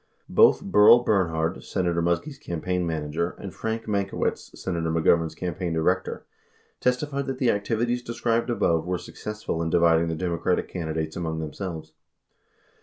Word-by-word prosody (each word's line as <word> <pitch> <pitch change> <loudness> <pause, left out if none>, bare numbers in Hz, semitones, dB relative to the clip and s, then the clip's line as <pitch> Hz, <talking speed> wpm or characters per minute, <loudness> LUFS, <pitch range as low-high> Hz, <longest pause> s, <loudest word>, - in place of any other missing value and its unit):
84 - - -13
Both - - +6
Berl 105 +3 +7
Bernhard, 85 -6 0
Senator 85 -3 -1
Muskie's 85 - -1
campaign 90 +1 -2
manager, 80 +2 -2
and 95 - -8
Frank 110 0 -3
Mankiewicz, 100 -2 -2
Senator 85 -3 -2
Mc 80 0 0
Govern's 80 -1 +3
campaign 90 -1 -3
director, 90 +3 0 0.5
testified 140 +2 0
that 135 -1 -3
the 125 -3 +3
activities 115 +4 -1
described 120 0 -1
abm 120 - -1
e 80 -1 +3
Avere 90 -1 -1
successful 105 -6 -5
in 80 - -1
dividing 85 -1 +4
the 80 - -2
Democratic 85 +1 -1
candidates 80 -2 -3
among 80 -2 -3
themselves. 80 +1 -6
90 Hz, 150 wpm, -25 LUFS, 80-110 Hz, 0.5 s, Berl